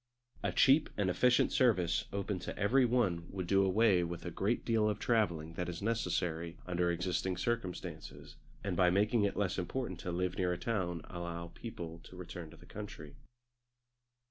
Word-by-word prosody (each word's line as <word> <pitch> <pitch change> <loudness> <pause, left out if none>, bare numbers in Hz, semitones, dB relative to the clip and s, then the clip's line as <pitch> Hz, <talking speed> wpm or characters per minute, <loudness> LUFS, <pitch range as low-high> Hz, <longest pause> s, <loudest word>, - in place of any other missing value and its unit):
A - - 0
cheap 140 +3 +5
and 95 -3 +2
efficient 125 +6 +3
service 95 -10 +3
open 100 -1 -2
to - - -6
every 125 +6 +4
one 100 -9 +1
would 95 -2 -4
do 95 +2 +4
away 95 -1 +4
with 85 +1 -5
a 90 - -3
great 105 +8 0
deal 110 -2 +3
of 105 - -1
travelling 85 -9 0
that 90 +1 -3
is 85 -1 -5
necessary 90 -7 -1
under 90 -1 +1
existing 90 +1 -1
circumstances, 115 -3 -4 0.3
and 100 -3 -1
by 90 0 +5
making 105 +4 +3
it 100 - -1
less 95 -2 0
important 95 0 -3
to 90 - -4
live 90 +1 -1
near 90 -1 +2
a - - -3
town 90 -5 -2
allow 85 -1 -6
people 85 -8 -7
to - - -12
return 85 -2 -7
to - - -14
the - - -16
country. 95 -8 -8
90 Hz, 175 wpm, -34 LUFS, 85-105 Hz, 0.3 s, cheap